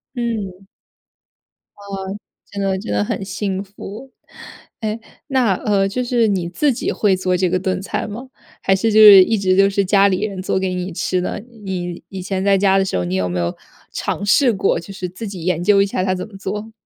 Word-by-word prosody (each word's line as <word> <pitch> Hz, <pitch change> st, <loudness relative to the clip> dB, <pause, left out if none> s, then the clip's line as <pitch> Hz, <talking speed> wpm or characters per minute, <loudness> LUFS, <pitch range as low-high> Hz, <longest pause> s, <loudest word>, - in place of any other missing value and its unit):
嗯。 210 Hz, -6 st, -4 dB, 1.1 s
哦， 195 Hz, -1 st, -6 dB, 0.3 s
真 200 Hz, -, -4 dB
的 195 Hz, -1 st, 0 dB
真 145 Hz, -, -6 dB
的 105 Hz, 0 st, +1 dB
很 105 Hz, -, -3 dB
幸 195 Hz, 0 st, -3 dB
福。 205 Hz, +5 st, -10 dB, 0.7 s
诶， 220 Hz, 0 st, -2 dB, 0.3 s
那， 255 Hz, -8 st, +2 dB
呃， 195 Hz, 0 st, +1 dB
就 250 Hz, +5 st, -2 dB
是 240 Hz, -2 st, +2 dB
你 190 Hz, -4 st, -1 dB
自 280 Hz, +11 st, +1 dB
己 240 Hz, -, -2 dB
会 200 Hz, -3 st, +2 dB
做 185 Hz, 0 st, 0 dB
这 180 Hz, 0 st, +1 dB
个 185 Hz, +1 st, 0 dB
炖 185 Hz, 0 st, -2 dB
菜 195 Hz, -, -3 dB
吗， 235 Hz, +5 st, -8 dB, 0.3 s
还 195 Hz, -, +3 dB
是 225 Hz, +4 st, 0 dB
就 215 Hz, -, +5 dB
是 205 Hz, -3 st, +10 dB
一 225 Hz, +4 st, 0 dB
直 185 Hz, -2 st, +1 dB
都 195 Hz, 0 st, +5 dB
是 200 Hz, 0 st, +1 dB
家 200 Hz, +1 st, +4 dB
里 185 Hz, -1 st, 0 dB
人 200 Hz, -3 st, -3 dB
做 190 Hz, -, -1 dB
给 190 Hz, -1 st, -1 dB
你 180 Hz, +1 st, -4 dB
吃 185 Hz, +2 st, -1 dB
呢？ 180 Hz, -, -3 dB, 0.3 s
你 175 Hz, -2 st, -4 dB
以 190 Hz, -1 st, -6 dB
前 190 Hz, +1 st, -3 dB
在 200 Hz, 0 st, +4 dB
家 195 Hz, 0 st, +3 dB
的 195 Hz, -, +2 dB
时 -, -, -3 dB
候， 90 Hz, -, -1 dB
你 90 Hz, +1 st, -2 dB
有 95 Hz, -1 st, 0 dB
没 90 Hz, 0 st, -2 dB
有 85 Hz, 0 st, -2 dB, 0.4 s
尝 205 Hz, -, -3 dB
试 240 Hz, +4 st, +4 dB
过 195 Hz, -3 st, +1 dB
就 175 Hz, +4 st, -10 dB
是 185 Hz, -2 st, -5 dB
自 200 Hz, +5 st, -7 dB
己 190 Hz, -4 st, -7 dB
研 180 Hz, -2 st, 0 dB
究 200 Hz, +1 st, +5 dB
一 -, -, +3 dB
下 195 Hz, -2 st, -2 dB
它 185 Hz, 0 st, 0 dB
怎 185 Hz, -, -5 dB
么 205 Hz, -3 st, -12 dB
做？ 210 Hz, +3 st, -5 dB
195 Hz, 240 characters per minute, -19 LUFS, 185-205 Hz, 1.1 s, 是